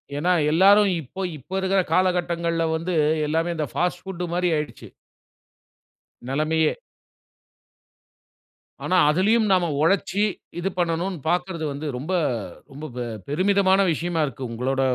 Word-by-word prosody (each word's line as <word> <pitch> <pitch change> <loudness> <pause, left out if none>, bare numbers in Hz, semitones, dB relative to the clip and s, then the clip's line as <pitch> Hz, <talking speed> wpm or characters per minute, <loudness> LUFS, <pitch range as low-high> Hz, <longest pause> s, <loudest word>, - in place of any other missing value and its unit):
ஏன்னா 165 +5 +1 0.2
எல்லாரும் 200 +5 +6
இப்ப 185 +7 -6
இப்ப 135 - -20
இருக்குற 190 +1 +1
காலகட்டங்கள்ல 170 -2 +1
வந்து 165 +3 -3 0.3
எல்லாமே, 165 +3 0
இந்த 155 -2 -1
ஃபாஸ்ட் 180 0 -1
புட் 180 -2 -5
மாரி 180 0 +1
ஆயிடுச்சு. 150 0 -6 1.4
நெலமையே 155 +3 +1 2.1
ஆனா, 185 - +1
அதிலயும் 210 +7 +3
நாம 180 -3 +3
ஒழச்சு 195 +4 +2 0.4
இது 190 - -1
பண்ணனும்னு 175 +1 -1
பார்க்கிறது 175 -2 -1
வந்து, 145 +3 -6
ரொம்ப 155 +9 -4 0.6
ரொம்ப 145 +3 -8
பெ 125 - -2 0.3
பெருமிதமான 190 +4 +3
விஷயமா 165 +1 -1
இருக்கு. 135 -1 -7
உங்களோட 130 +3 -1
175 Hz, 115 wpm, -23 LUFS, 155-185 Hz, 2.1 s, எல்லாரும்